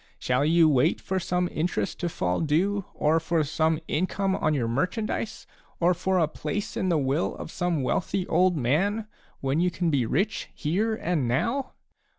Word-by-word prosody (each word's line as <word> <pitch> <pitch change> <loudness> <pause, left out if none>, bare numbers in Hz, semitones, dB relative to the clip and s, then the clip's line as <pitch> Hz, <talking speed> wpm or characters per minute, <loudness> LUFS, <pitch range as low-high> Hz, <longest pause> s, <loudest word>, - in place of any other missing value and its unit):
Shall 125 +2 +1
you 165 +1 +5
wait 145 +2 +3
for 190 0 -2
some 180 0 0
interest 170 +3 -2
to 175 - -1
fall 90 - -1
due, 180 +6 +1
or 155 +2 +2
for 165 0 +1
some 160 +2 +1
income 190 +3 0
on 155 -1 +1
your 120 -5 0
merchandise, 210 - -2 0.3
or 175 +1 +4
for 185 +2 0
a 165 -3 +3
place 160 +6 -4
in 185 - 0
the 170 - +3
will 140 +3 0
of - - -8
some 175 -5 -1
wealthy 185 +7 -1
old 180 +1 +3
man, 185 - +1 0.4
when 135 +3 0
you 180 +1 +3
can 170 -1 -1
be 130 -6 +1
rich 195 - -1
here 205 +8 0
and 165 - -1
now 230 - -1
170 Hz, 175 wpm, -26 LUFS, 150-185 Hz, 0.4 s, you